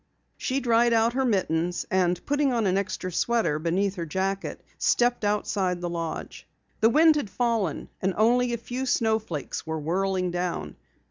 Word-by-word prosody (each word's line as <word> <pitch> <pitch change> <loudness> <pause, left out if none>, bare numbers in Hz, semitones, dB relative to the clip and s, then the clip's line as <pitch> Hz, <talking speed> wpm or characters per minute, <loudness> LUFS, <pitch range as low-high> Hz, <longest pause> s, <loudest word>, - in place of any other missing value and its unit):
She 265 +1 -1
dried 235 -1 +3
out 230 +1 +3
her 265 +1 +1
mittens, 175 -6 0
and 180 -2 +1
putting 290 -1 +1
on 230 -3 +1
an 185 -1 +2
extra 195 -1 -2
sweater 220 -5 +1
beneath 185 +5 0
her 170 - -3
jacket, 190 +4 -2 0.2
stepped 240 -1 +2
outside 200 -3 0
the 175 -1 -3
lodge. 165 -1 -5 0.3
The 225 - +5
wind 315 +5 +5
had 255 -9 -2
fallen 230 - -1
and 190 0 0
only 240 +3 +3
a 235 - -1
few 250 +3 -4
snowflakes 220 - -1
were 160 0 -2
whirling 185 +3 0
down. 175 0 -3
200 Hz, 160 wpm, -26 LUFS, 180-235 Hz, 0.3 s, The